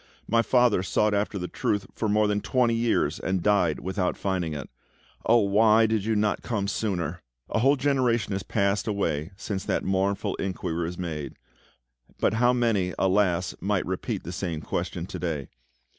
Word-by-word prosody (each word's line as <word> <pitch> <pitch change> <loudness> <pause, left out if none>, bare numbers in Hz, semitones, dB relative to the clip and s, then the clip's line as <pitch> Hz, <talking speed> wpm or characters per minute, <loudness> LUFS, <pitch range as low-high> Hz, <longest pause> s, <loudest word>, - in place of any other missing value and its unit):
My 115 +2 +3
father 120 -4 +3
sought 105 +3 +1
after 100 0 0
the 90 -1 -3
Truth 100 +2 -1
for 110 - -2
more 105 +1 +3
than 105 0 0
twenty 125 -2 +2
years, 115 0 +1
and 95 -2 -1
died 100 -6 +2
without 95 0 -1
finding 90 -5 -2
it. 70 -4 -6 0.6
Oh, 115 +1 +6
why 110 +2 +5
did 110 -2 0
you 110 0 +1
not 105 0 +1
come 105 -5 -2
sooner?" 90 -6 -2 0.3
A - - +1
whole 135 +5 +4
generation 130 -6 +1
has 95 - -2
passed 100 +1 0
away 80 -7 -1
since 95 -1 -4
that - - 0
mournful 95 +1 0
inquiry 85 -3 -2
was 90 +2 -5
made; 80 -5 -5 0.8
but - - +2
how 120 +2 +4
many, 115 -7 +1
alas! 95 -2 +2
might - - 0
repeat - - -3
the 85 - -6
same 85 -3 -3
question 85 +2 -3
to 95 -1 -7
day? 80 -6 -3
100 Hz, 175 wpm, -26 LUFS, 90-110 Hz, 0.8 s, Oh